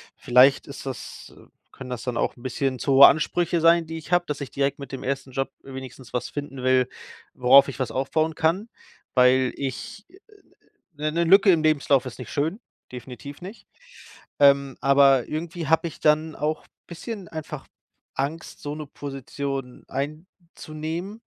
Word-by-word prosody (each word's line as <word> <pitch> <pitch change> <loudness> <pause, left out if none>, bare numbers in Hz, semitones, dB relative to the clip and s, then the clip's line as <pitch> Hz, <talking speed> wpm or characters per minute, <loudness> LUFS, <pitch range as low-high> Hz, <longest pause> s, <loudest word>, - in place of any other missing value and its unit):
Vielleicht 130 +3 +4
ist 140 -1 -9
das, 130 -3 -8
äh - - -17 0.2
können 130 -1 -10
das 120 -2 -4
dann 125 -2 -3
auch - - 0
'n 120 - -17
bisschen 130 +1 -2
zu 140 - 0
hohe 135 +1 +10
Ansprüche 170 +2 +1
sein, 165 0 +5
die 160 0 -6
ich 160 - -13
habe, 175 0 +3
dass 150 -3 -5
ich 140 - -5
direkt 140 0 -1
mit 140 -2 -9
dem 135 - -6
1. 135 0 -3
Job 135 +1 -2
wenigstens 130 -1 -10
was 125 -1 -2
finden 140 -3 -6
will, 130 0 +3 0.5
worauf 135 +2 +6
ich 135 0 -8
was 130 - -2
aufbauen 155 +4 0
kann, 165 +8 0 0.5
weil 130 0 +4
ich, 140 - -6
äh 375 +3 -19 0.8
ne, 150 +1 -2
'ne 170 +2 +1
Lücke 195 +3 +6
im 165 -3 +3
Lebenslauf 145 -3 +2
ist 130 - -8
nicht 125 - -8
schön, 160 +8 -1 0.3
definitiv 125 +4 -9
nicht. 195 +6 -10 0.7
Ähm, 140 -1 +4
aber 135 -2 +5
irgendwie 165 +1 -5
habe 160 +2 +2
ich 160 - -10
dann 155 +1 +2
auch 155 +1 -2 0.2
bisschen 195 +3 -7
einfach 155 -2 -7 0.5
Angst, 150 +5 -4
so 145 - -5
'ne 155 -1 -7
Position 135 -2 -6
einzunehmen 160 - -6
140 Hz, 170 wpm, -24 LUFS, 135-160 Hz, 0.8 s, hohe